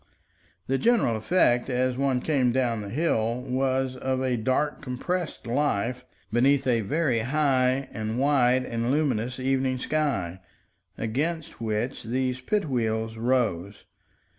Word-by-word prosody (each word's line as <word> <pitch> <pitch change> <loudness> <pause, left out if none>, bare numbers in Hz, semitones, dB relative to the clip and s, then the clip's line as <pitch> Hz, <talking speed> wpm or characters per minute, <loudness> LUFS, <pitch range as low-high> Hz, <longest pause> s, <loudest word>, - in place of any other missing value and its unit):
The 135 0 0
general 230 - +3
effect, 120 0 +2
as 130 0 +1
one 135 -1 +1
came 130 -5 +2
down 120 -3 0
the 100 - -6
hill, 120 -4 0
was 130 0 0
of 130 0 -1
a 130 -1 0
dark 130 +6 0
compressed 150 +6 -3
life 125 -1 -1 0.3
beneath 135 +3 +3
a 120 -3 +2
very 135 +1 +1
high 130 0 +1
and 110 0 -3
wide 130 -2 +3
and 115 0 -2
luminous 125 -4 0
evening 130 0 0
sky, 125 - -1 0.6
against 145 +7 -3
which 115 +4 -2
these 130 +2 -2
pit 205 +8 0
wheels 110 -3 -1
rose. 110 -6 -1
130 Hz, 130 wpm, -26 LUFS, 115-135 Hz, 0.6 s, general